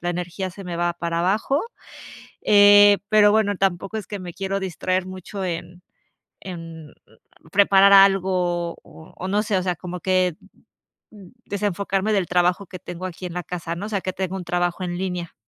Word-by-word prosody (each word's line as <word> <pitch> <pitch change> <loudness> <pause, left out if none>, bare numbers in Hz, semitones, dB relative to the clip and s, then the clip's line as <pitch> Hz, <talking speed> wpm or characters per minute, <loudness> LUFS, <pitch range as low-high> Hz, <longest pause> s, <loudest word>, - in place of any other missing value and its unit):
la 175 - -2
energía 180 +2 -4
se 195 +2 -11
me 175 -1 -5
va 175 0 0
para 170 -1 -2
abajo. 210 - +1 0.8
Eh, 205 0 +7
pero 210 -1 +5
bueno, 210 -2 +2
tampoco 195 +2 -1
es 210 - -7
que 205 - -6
me 180 -2 -8
quiero 195 +1 -3
distraer 185 0 -2
mucho 185 +1 -7
en 175 +1 -6 0.6
en 165 -4 -9 0.6
preparar 200 0 +5
algo, 185 -3 +3
o 160 - -16
o 185 - -6
no 205 +2 +1
sé, 210 -2 -1
o 185 - -2
sea, 180 -1 -1
como 180 +1 -7
que 185 -2 +1 0.7
mm, 200 -4 -14 0.2
desenfocarme 200 0 -1
del 195 -3 +1
trabajo 180 +2 +1
que 185 - -9
tengo 175 +2 -7
aquí 185 +1 -9
en 175 - -7
la 180 - -3
casa, 170 -2 -5
¿no? 195 +4 -5
O - - -6
sea, 200 -3 -2
que 185 - -3
tengo 190 0 -3
un 185 - -6
trabajo 175 +1 -1
en 175 0 -4
línea. 180 -2 -4
185 Hz, 185 wpm, -22 LUFS, 175-195 Hz, 0.8 s, Eh